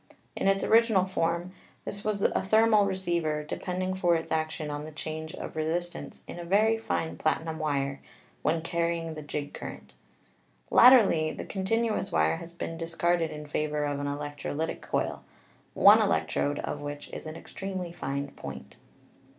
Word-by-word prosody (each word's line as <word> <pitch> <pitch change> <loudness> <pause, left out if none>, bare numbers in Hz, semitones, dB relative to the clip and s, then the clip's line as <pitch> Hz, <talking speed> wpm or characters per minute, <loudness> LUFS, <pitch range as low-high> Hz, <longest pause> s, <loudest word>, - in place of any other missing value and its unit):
In - - 0
its 195 0 +3
original 225 -4 +4
form 170 -1 -1 0.3
this 200 +1 -3
was 210 -2 -1
a - - +2
thermal 215 +1 +4
receiver, 170 -5 -1
depending 185 +4 -3
for 175 -2 +2
its 165 - -3
action 155 -1 -1
on 145 0 -4
the 155 - -8
change 155 0 -6
of - - -7
re 155 - 0
sistance 175 +2 -4
in - - -8
a - - -5
very 210 +6 +3
fine 225 -7 -2
platinum 160 0 -1
wire 140 -3 -1 0.4
when 160 +2 +1
carrying 170 -1 -1
the 155 - -7
jig 145 0 -5
current. - - -8 0.8
Latterly 200 -11 +7
the - - -6
continuous 220 +3 0
wire 80 +1 +2
has 170 - -9
been 165 -1 -5
dis 165 0 -6
carded 170 -1 +2
in 150 0 -7
favor 150 0 -1
of 145 -1 -2
an 145 - -2
electrolytic 145 +2 -3
coil, - - -2 0.5
one - - +8
electrode 145 0 +1
of 145 - -4
which 145 0 -6
is - - -6
an 155 - -6
extremely 185 -1 -5
fine 140 -3 -3
point. 65 -1 -9
165 Hz, 165 wpm, -28 LUFS, 150-185 Hz, 0.8 s, one